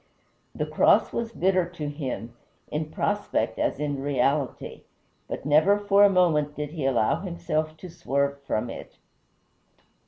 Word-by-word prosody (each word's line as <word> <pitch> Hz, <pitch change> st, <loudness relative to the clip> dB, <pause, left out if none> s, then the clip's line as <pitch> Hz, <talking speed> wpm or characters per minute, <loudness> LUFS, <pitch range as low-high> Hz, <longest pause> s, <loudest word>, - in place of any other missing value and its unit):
The -, -, -1 dB
cross -, -, +3 dB
was 230 Hz, -1 st, -2 dB
bitter 185 Hz, -3 st, +1 dB
to 160 Hz, -4 st, -6 dB
him, 135 Hz, -5 st, -5 dB, 0.4 s
in 155 Hz, +1 st, -2 dB
prospect -, -, -1 dB
as -, -, 0 dB
in 145 Hz, -2 st, -2 dB
reality, 140 Hz, 0 st, -1 dB, 0.5 s
but -, -, -6 dB
never 155 Hz, +8 st, +4 dB
for 205 Hz, 0 st, +4 dB
a 205 Hz, -, +7 dB
moment 155 Hz, -6 st, +2 dB
did 150 Hz, -1 st, -4 dB
he 155 Hz, -5 st, -2 dB
allow 120 Hz, -5 st, +2 dB
himself 155 Hz, -4 st, -3 dB
to 185 Hz, -, -9 dB
swerve 140 Hz, -5 st, -2 dB
from 120 Hz, -4 st, -2 dB
it. -, -, -10 dB
150 Hz, 145 wpm, -26 LUFS, 140-180 Hz, 0.5 s, a